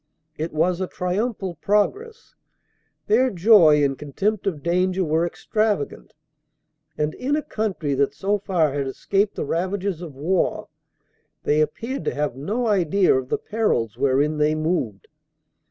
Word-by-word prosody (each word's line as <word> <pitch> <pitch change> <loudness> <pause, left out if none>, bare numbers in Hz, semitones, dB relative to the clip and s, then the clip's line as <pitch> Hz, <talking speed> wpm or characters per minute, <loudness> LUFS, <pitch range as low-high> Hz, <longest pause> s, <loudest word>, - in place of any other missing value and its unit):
It 160 +2 -4
was 170 +4 +1
a 185 - -1
triumphal 190 0 -3
pro 205 0 +4
gress. 455 +2 -14 0.7
Their 250 +5 +3
joy 175 -7 +5
and 135 -1 +1
contempt 195 +10 -2
of 155 -7 -2
danger 185 +2 +1
were 165 +1 +1
extravagant, 215 -4 -2 0.8
and, 150 +1 -1
in 275 +3 -1
a 305 - -1
country 190 - -2
that 140 +1 +1
so 200 +5 0
far 175 -7 +1
had 140 -1 -2
escaped 200 +9 0
the - - -3
ravages 185 +2 -2
of 160 -6 -8
war, 170 +7 -1 0.7
they 150 +1 +2
appeared 230 - -3
to - - -1
have 145 -4 -1
no 210 - -2
idea 195 -3 +3
of 130 -1 -2
the - - +1
perils 205 - -1
wherein 140 +4 +1
they 150 +1 +2
moved. 155 - -2
180 Hz, 150 wpm, -23 LUFS, 150-205 Hz, 0.8 s, joy